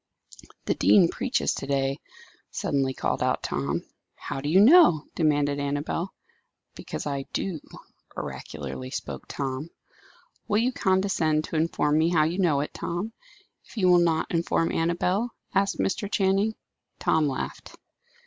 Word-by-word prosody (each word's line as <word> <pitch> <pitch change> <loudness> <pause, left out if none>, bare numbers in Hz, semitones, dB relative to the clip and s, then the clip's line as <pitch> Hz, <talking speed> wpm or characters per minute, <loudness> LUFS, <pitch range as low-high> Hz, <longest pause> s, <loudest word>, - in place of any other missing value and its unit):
"The - - +1
dean 180 -5 +5
preaches 260 0 0
to - - -6
day," 135 0 0 0.5
suddenly 135 -2 -1
called - - -1
out - - 0
Tom. 70 0 -2 0.3
"How 135 - -5
do 145 - -2
you 180 +5 +5
know?" 225 - +7
demanded 145 -3 +1
Annabel. 145 +5 -2 0.6
"Because - - -6
I 140 -2 -3
do," 180 -5 -2 0.6
oracularly 65 -4 -6
spoke - - -6
Tom. 135 +3 -4 0.8
"Will 210 - +2
you 240 +4 +2
condescend 185 -7 +1
to 160 - -6
inform 155 -1 +1
me 160 +1 +3
how 165 -3 +3
you 165 +5 -1
know 155 -7 +3
it, 150 - -5
Tom, 195 +7 -4 0.5
if - - -17
you 185 -3 +3
will 175 - +6
not 165 -2 +1
inform 165 -1 +1
Annabel?" 180 +7 0 0.2
asked 195 0 +1
Mr. 200 +1 -1
Channing. 200 +2 +2 0.4
Tom 155 -2 +2
laughed. 135 - -5
165 Hz, 140 wpm, -26 LUFS, 145-190 Hz, 0.8 s, know